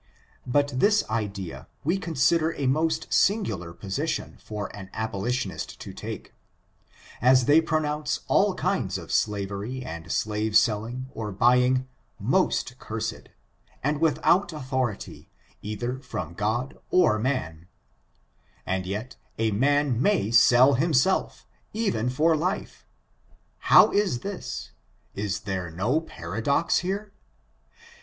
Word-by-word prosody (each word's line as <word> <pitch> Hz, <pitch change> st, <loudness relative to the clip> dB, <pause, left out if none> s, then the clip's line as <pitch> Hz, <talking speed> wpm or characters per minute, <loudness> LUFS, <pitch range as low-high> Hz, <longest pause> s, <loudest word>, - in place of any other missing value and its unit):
But 145 Hz, +2 st, +1 dB
this 210 Hz, +5 st, +3 dB
idea, 100 Hz, -5 st, -4 dB, 0.2 s
we 170 Hz, +6 st, +1 dB
consider 165 Hz, -1 st, +2 dB
a 140 Hz, -, -3 dB
most 155 Hz, +5 st, 0 dB
singular 110 Hz, -, +1 dB
position 95 Hz, +3 st, -3 dB
for 105 Hz, -2 st, -6 dB
an 95 Hz, -2 st, -9 dB
abolitionist 110 Hz, 0 st, -3 dB
to -, -, -8 dB
take, -, -, -7 dB, 0.9 s
as 130 Hz, 0 st, +5 dB
they 150 Hz, +5 st, +6 dB
pronounce 155 Hz, -1 st, -1 dB
all -, -, +3 dB
kinds -, -, -1 dB
of -, -, -9 dB
slavery 105 Hz, +4 st, -1 dB
and 85 Hz, -7 st, -7 dB
slave 105 Hz, 0 st, +1 dB
selling 115 Hz, +3 st, 0 dB
or 110 Hz, -2 st, -4 dB
buying 125 Hz, +5 st, +3 dB, 0.3 s
most -, -, 0 dB
cursed, -, -, -5 dB, 0.5 s
and 150 Hz, +2 st, 0 dB
without 175 Hz, +3 st, +3 dB
authority, 130 Hz, -7 st, -4 dB, 0.3 s
either 120 Hz, +5 st, -4 dB
from 90 Hz, -, -6 dB
God 110 Hz, +8 st, -2 dB
or 165 Hz, -12 st, +4 dB
man; 90 Hz, -, -2 dB, 1.0 s
and 95 Hz, 0 st, -2 dB
yet 105 Hz, +6 st, -5 dB, 0.2 s
a 110 Hz, -1 st, +1 dB
man 135 Hz, +2 st, +2 dB
may 170 Hz, -, +2 dB
sell 125 Hz, +3 st, +6 dB
hifnself, 150 Hz, -3 st, +1 dB, 0.3 s
even 200 Hz, -, 0 dB
for 160 Hz, +6 st, +3 dB
life. 180 Hz, +6 st, -3 dB, 0.7 s
How -, -, +6 dB
is 200 Hz, -12 st, +1 dB
this? 200 Hz, -1 st, -6 dB, 0.4 s
Is 100 Hz, -1 st, -3 dB
there 95 Hz, -4 st, -3 dB
no 110 Hz, -, 0 dB
paradox 110 Hz, -, 0 dB
here 200 Hz, +3 st, -4 dB
125 Hz, 115 wpm, -26 LUFS, 105-150 Hz, 1.0 s, they